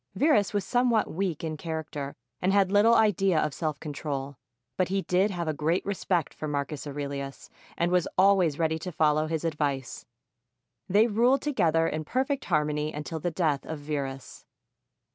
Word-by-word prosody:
Verus 280 Hz, -10 st, +3 dB
was 205 Hz, -2 st, -1 dB
somewhat 245 Hz, -2 st, +2 dB
weak 175 Hz, -3 st, -2 dB
in 155 Hz, -1 st, -3 dB
character 155 Hz, -3 st, -5 dB, 0.3 s
and 185 Hz, -, +2 dB
had 195 Hz, -1 st, +3 dB
little 215 Hz, +3 st, +5 dB
idea 195 Hz, -6 st, +3 dB
of 150 Hz, -2 st, 0 dB
self 155 Hz, -2 st, -3 dB
control; 140 Hz, -2 st, -4 dB, 0.4 s
but 185 Hz, -, +1 dB
he 195 Hz, 0 st, -1 dB
did 185 Hz, +3 st, +2 dB
have 175 Hz, -4 st, -3 dB
a 155 Hz, -, 0 dB
great 160 Hz, +4 st, 0 dB
respect 185 Hz, -4 st, -1 dB
for 155 Hz, -, -5 dB
Marcus 145 Hz, 0 st, -3 dB
Aurelius 140 Hz, -1 st, -6 dB, 0.3 s
and 170 Hz, +1 st, +1 dB
was 180 Hz, -2 st, +2 dB
always 185 Hz, -6 st, +4 dB
ready 160 Hz, -1 st, 0 dB
to 180 Hz, +3 st, -5 dB
follow 155 Hz, -1 st, +2 dB
his 160 Hz, 0 st, -2 dB
advice. 145 Hz, -5 st, -2 dB, 0.8 s
They 205 Hz, +4 st, +5 dB
ruled 240 Hz, +4 st, +2 dB
together 165 Hz, -, +2 dB
in 155 Hz, 0 st, -2 dB
perfect 265 Hz, -, -1 dB
harmony 150 Hz, 0 st, 0 dB
until 150 Hz, +2 st, -5 dB
the 175 Hz, -, -1 dB
death 155 Hz, -4 st, 0 dB
of 160 Hz, -, -5 dB
Verus. 140 Hz, -3 st, -5 dB
160 Hz, 165 wpm, -27 LUFS, 150-195 Hz, 0.8 s, little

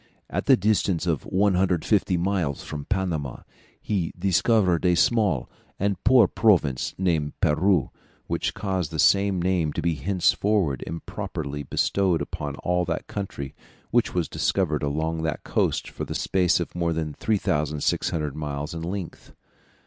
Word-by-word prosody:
At -, -, -2 dB
the -, -, +7 dB
distance 95 Hz, -4 st, +1 dB
of 80 Hz, -5 st, -1 dB
150 95 Hz, 0 st, +2 dB
miles 85 Hz, -6 st, -1 dB
from 75 Hz, -2 st, -6 dB
Panama 85 Hz, -, -2 dB, 0.4 s
he 95 Hz, -6 st, -2 dB
discovered 95 Hz, -1 st, +2 dB
a 90 Hz, -1 st, +4 dB
small 100 Hz, -, +2 dB, 0.3 s
and 100 Hz, 0 st, -1 dB
poor 125 Hz, +1 st, +6 dB
province 85 Hz, -, +2 dB
named 80 Hz, -6 st, 0 dB
Peru, 85 Hz, +1 st, +2 dB, 0.3 s
which -, -, -2 dB
caused 95 Hz, -6 st, -2 dB
the 80 Hz, -, -6 dB
same 100 Hz, +2 st, +4 dB
name 90 Hz, -3 st, +1 dB
to -, -, -2 dB
be 85 Hz, -, +2 dB
henceforward 90 Hz, -, +1 dB
improperly 75 Hz, -3 st, -5 dB
bestowed 90 Hz, +5 st, +1 dB
upon 70 Hz, -2 st, -4 dB
all 90 Hz, 0 st, +1 dB
the -, -, -2 dB
country 80 Hz, -9 st, -5 dB, 0.4 s
which -, -, +1 dB
was -, -, +1 dB
discovered 80 Hz, -7 st, 0 dB
along 80 Hz, +3 st, -1 dB
that 80 Hz, -2 st, -2 dB
coast -, -, 0 dB
for -, -, -6 dB
the -, -, -5 dB
space 90 Hz, -2 st, +2 dB
of 85 Hz, -, -4 dB
more 85 Hz, -1 st, 0 dB
than 80 Hz, -2 st, -3 dB
3600 75 Hz, -5 st, -1 dB
miles 75 Hz, 0 st, -4 dB
in 85 Hz, -, -5 dB
length. 90 Hz, +1 st, -6 dB
85 Hz, 140 wpm, -25 LUFS, 75-95 Hz, 0.4 s, the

